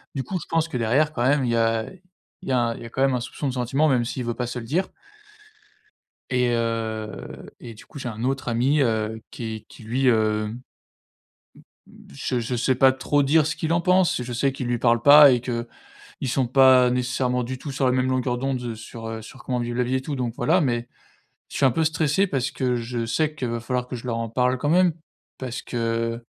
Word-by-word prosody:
Du 135 - -2
coup, 180 +8 -3
je - - -9
pense 165 0 +1
que 130 - -4
derrière 130 +7 +2
quand 120 - -1
même, 140 +1 +3
il 120 - 0
y - - +1
a 115 -1 +1 0.6
il - - -6
y - - 0
a 120 -2 +1
il - - -11
y - - -8
a - - -8
quand 130 - -4
même 135 -2 +3
un - - 0
soupçon 140 +3 -5
de 130 - -2
sentiment 135 +5 +1
même 120 -3 +2
s'il 125 +1 -4
veut 120 - -1
pas 125 -1 -3
se 125 0 -4
le 115 - -8
dire. 175 +9 -1 1.4
Et, 125 -1 +2
heu, 115 -2 -3
et 115 -2 -10
du 105 - -15
coup, 140 - -11
j'ai 125 - -4
un 110 +1 -6
autre 135 0 -2
ami, 130 +5 +2
heu, 110 -2 -1
qui 120 - -8
est - - -16
qui - - -14
lui, 130 +4 0
hem, 120 - +6 1.7
m - - -20
mmh, - - -17
je 120 - -2
je 120 +2 -3
sais 130 +2 +1
pas 130 +1 +5
trop 145 +2 +1
dire 150 +2 +3
ce 150 - -2
qu'il 160 0 -1
en 170 - +2
pense, 180 -5 +2
je 120 0 -6
sais 135 +3 +1
qu'il 130 -2 -5
lui 120 0 0
parle 120 0 +3
pas 145 -1 +9
et 120 - +2
qu'ils 120 -1 -6 0.4
sont 130 -1 +1
pas 130 -1 +6
nécessairement 125 0 0
du 130 +2 -5
tout 140 +1 -7
sur 135 -1 0
la 125 - +3
même 130 0 +1
longueur 125 -1 0
d'onde 125 -3 -3
sur, 115 +1 -9
heu, 110 0 -5
sur 120 +4 -13
comment 125 -1 -2
vivre 120 0 -3
la 125 - +2
vie 130 +2 -1
et 130 - 0
tout 145 +1 -4
donc 120 -3 -2
voilà, 175 +4 +3
mais 120 -4 -1 0.6
je - - -10
suis 140 - +3
un 130 - +5
peu 160 +5 0
stressé 160 +4 +1
parce 135 -4 -1
que 125 -1 -1
je 115 0 -3
sais 150 +7 0
qu'il 130 -5 -4
va 115 0 -3
falloir 125 +1 -2
que 125 - -5
je 120 - -8
leur 115 - -1
en 115 0 -2
parle 125 +2 +1
quand 145 +3 -1
même 180 0 +4 0.5
parce 125 -2 -5
que 115 0 -2
125 Hz, 245 wpm, -24 LUFS, 115-135 Hz, 1.7 s, pas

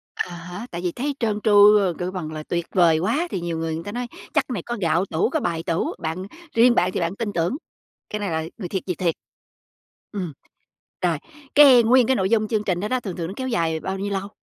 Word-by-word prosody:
À 180 -1 -3
há, 180 +6 -8
tại 170 - -5
vì 175 -2 -1
thấy 280 +3 -2
trơn 215 -2 0
tru, 210 0 +7
ơ, 190 -4 +2
kêu 180 0 -2
bằng 170 -5 -5
là 155 0 -5
tuyệt 170 +1 -3
vời 170 -4 +5
quá 295 - 0
thì 185 - -2
nhiều 170 -1 -3
người 160 0 -2
người 165 - -5
ta 205 - -6
nói: 245 +1 -3 0.3
"Chắc - - +3
cái 250 - -3
này 175 - -3
có 240 0 -4
gạo 175 +1 +2
tủ, 165 +8 0
có 315 +1 0
bài 170 -7 -2
tủ", 165 0 -1
bạn 165 +4 -4 0.3
riêng 240 +1 +6
bạn 180 -3 +2
thì - - -2
bạn 170 +3 -2
tin 210 -2 -3
tưởng, 175 +9 0 0.5
cái 210 - -3
này 205 -3 -2
là 160 0 -1 0.2
người 180 -5 -5
thiệt 190 0 -2
việc 180 - -1
thiệt. 170 -3 0 1.0
Ừm. 185 -7 -4 0.7
Rồi, 170 -4 +1 0.4
cái 270 -5 +8
nguyên 245 +1 +5
cái 265 - +2
nội 190 -2 0
dung 215 -2 +2
chương 215 -2 0
trình 180 -3 0
đó 210 - -2
đó, 255 +1 0
thường 195 -7 -6
thường 170 -2 -3
nó 190 - -5
kéo 260 0 -3
dài 165 -8 0
bao 190 +3 -3
nhiêu 200 +1 -3
lâu? 195 0 -2
190 Hz, 260 wpm, -23 LUFS, 170-220 Hz, 1.0 s, cái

